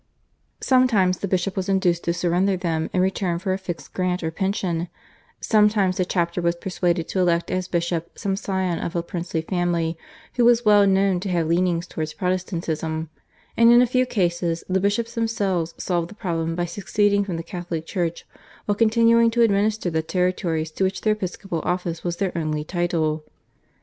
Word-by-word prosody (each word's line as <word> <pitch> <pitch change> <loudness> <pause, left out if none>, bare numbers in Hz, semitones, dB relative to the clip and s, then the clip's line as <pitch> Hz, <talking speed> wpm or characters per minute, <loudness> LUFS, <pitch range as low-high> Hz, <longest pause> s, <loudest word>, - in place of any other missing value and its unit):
Sometimes 220 -9 +3
the 200 - -2
bishop 185 +1 -1
was 190 0 -2
induced 180 -3 +1
to 170 - +1
surrender 180 +2 +1
them 165 -3 -2
in 185 - +1
return 185 -2 0
for 185 +2 -1
a - - -1
fixed 180 -3 -7
grant 180 -1 -1
or 160 - -1
pension, 180 -2 -1 0.5
sometimes 210 -3 +3
the 185 - +1
chapter 175 -1 -1
was 170 0 +1
persuaded 175 -2 -1
to 190 - -1
elect 170 -2 +1
as 185 -1 -1
bishop 170 -1 -2
some 195 -2 -1
scion 190 -3 -2
of 170 - -4
a 170 - 0
princely 170 -1 -3
family, 170 -2 -1 0.4
who 245 - +4
was 240 0 +4
well 205 -1 +6
known 195 -1 +3
to 190 +2 -4
have 170 -2 +1
leanings 170 +1 +1
towards 155 -1 -5
Protestantism, 165 -3 -2 0.4
and 230 0 +6
in 240 - +7
a 250 - +6
few 255 +1 +1
cases 175 -5 0
the 190 0 +1
bishops 215 +4 0
themselves 195 -7 -1
solved 175 -2 -1
the 210 - -12
problem 165 -5 -2
by 175 0 -1
seceding 200 +3 +1
from 185 -4 -4
the 165 - -5
Catholic 175 -3 -5
Church 170 -1 -3 0.4
while 205 - +1
continuing 230 +2 +4
to 235 +1 +2
administer 205 -3 +1
the 160 0 +1
territories 165 -1 -1
to 190 - -2
which 190 -1 -1
their 215 - +3
episcopal 185 -3 -4
office 175 -2 -2
was 175 -1 -2
their 190 -2 -2
only 155 -2 -1
title. 160 -2 -1
180 Hz, 180 wpm, -23 LUFS, 170-200 Hz, 0.5 s, in